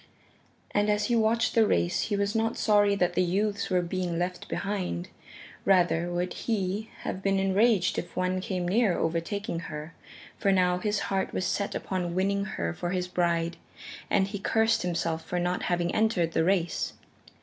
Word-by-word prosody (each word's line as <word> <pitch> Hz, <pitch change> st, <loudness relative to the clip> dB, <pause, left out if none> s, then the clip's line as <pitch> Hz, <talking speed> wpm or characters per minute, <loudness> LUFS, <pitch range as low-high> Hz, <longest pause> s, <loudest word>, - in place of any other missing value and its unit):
And 205 Hz, 0 st, +2 dB
as 210 Hz, 0 st, +2 dB
he 240 Hz, -, +3 dB
watched 225 Hz, 0 st, +2 dB
the 225 Hz, -2 st, +4 dB
race 85 Hz, 0 st, +1 dB
he 210 Hz, -, -1 dB
was 200 Hz, +1 st, 0 dB
not 225 Hz, 0 st, 0 dB
sorry 205 Hz, -2 st, +4 dB
that 180 Hz, -2 st, +1 dB
the 180 Hz, -, +2 dB
youths 200 Hz, +3 st, 0 dB
were 180 Hz, -2 st, +2 dB
being 175 Hz, -1 st, -2 dB
left 180 Hz, +1 st, -3 dB
behind. 190 Hz, -, -3 dB, 0.5 s
Rather 175 Hz, -2 st, +3 dB
would 175 Hz, +1 st, -1 dB
he 210 Hz, -1 st, -2 dB
have 190 Hz, -, -4 dB
been 195 Hz, 0 st, +1 dB
enraged 195 Hz, 0 st, +3 dB
if -, -, -8 dB
one 185 Hz, 0 st, 0 dB
came 185 Hz, -2 st, -2 dB
near 205 Hz, -1 st, +2 dB
overtaking 165 Hz, +2 st, -2 dB
her, 155 Hz, +2 st, -7 dB, 0.5 s
for 195 Hz, -, +3 dB
now 180 Hz, -1 st, +3 dB
his 210 Hz, +1 st, 0 dB
heart 190 Hz, 0 st, 0 dB
was 185 Hz, -, 0 dB
set 200 Hz, -, -1 dB
upon 180 Hz, -2 st, -2 dB
winning 200 Hz, +1 st, +1 dB
her 85 Hz, -, -3 dB
for 175 Hz, -, -4 dB
his 180 Hz, 0 st, -1 dB
bride, 170 Hz, -2 st, 0 dB, 0.5 s
and 195 Hz, -1 st, +2 dB
he 205 Hz, -1 st, -5 dB
cursed 225 Hz, +2 st, +2 dB
himself 165 Hz, -2 st, -1 dB
for 180 Hz, -, -3 dB
not 180 Hz, +1 st, 0 dB
having 175 Hz, -1 st, 0 dB
entered 210 Hz, -7 st, +2 dB
the 160 Hz, -, +2 dB
race. 175 Hz, -2 st, 0 dB
185 Hz, 175 wpm, -28 LUFS, 175-205 Hz, 0.5 s, the